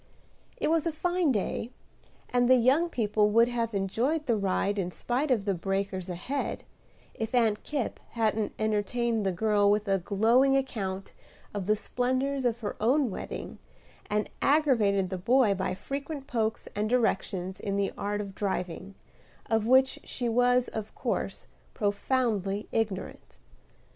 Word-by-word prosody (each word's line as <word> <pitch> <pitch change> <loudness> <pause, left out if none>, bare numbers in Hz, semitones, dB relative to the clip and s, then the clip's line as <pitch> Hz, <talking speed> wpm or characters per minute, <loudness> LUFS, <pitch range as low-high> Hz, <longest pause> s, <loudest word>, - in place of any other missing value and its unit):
It - - 0
was 330 0 +2
a - - +1
fine 350 0 +1
day, 220 +1 -2 0.6
and 245 0 +2
the 255 - +8
young 265 +8 +3
people 210 -6 +2
would 230 +2 +5
have 230 -2 -2
enjoyed 240 +11 0
the 235 -4 +2
ride 200 0 0
in 180 -2 -1
spite 250 +10 -1
of 225 -6 +2
the 200 - +1
breakers 195 +1 -2
ahead, 215 +11 -3 0.5
if 225 +2 -3
Aunt 225 -4 +2
Kipp 285 -6 -3
hadn't 220 -2 0
entertained 220 +1 0
the - - +2
girl 205 +2 +2
with 210 +1 +2
a 195 -1 +2
glowing 230 +9 +3
account 195 -8 -3 0.4
of 200 -3 -4
the 215 - +4
splendors 260 +4 -1
of 240 0 0
her 205 - -3
own 255 +2 +3
wedding, - - -6 0.5
and 210 0 0
aggravated 225 -11 +3
the 185 - -3
boy 235 +2 +4
by 185 -1 -2
frequent 280 - -5
pokes 225 -3 -1
and 210 +1 0
directions 195 -6 0
in 200 -1 -2
the 200 -1 0
art 205 +1 -2
of 200 -1 -7
driving, 190 -1 -3 0.6
of 220 -1 +2
which 260 +1 +4
she 245 - -4
was 245 +1 +3
of 220 -1 -6
course, - - -3 0.3
profoundly 205 -2 0
ignorant. 210 -4 -3
220 Hz, 150 wpm, -28 LUFS, 200-255 Hz, 0.6 s, the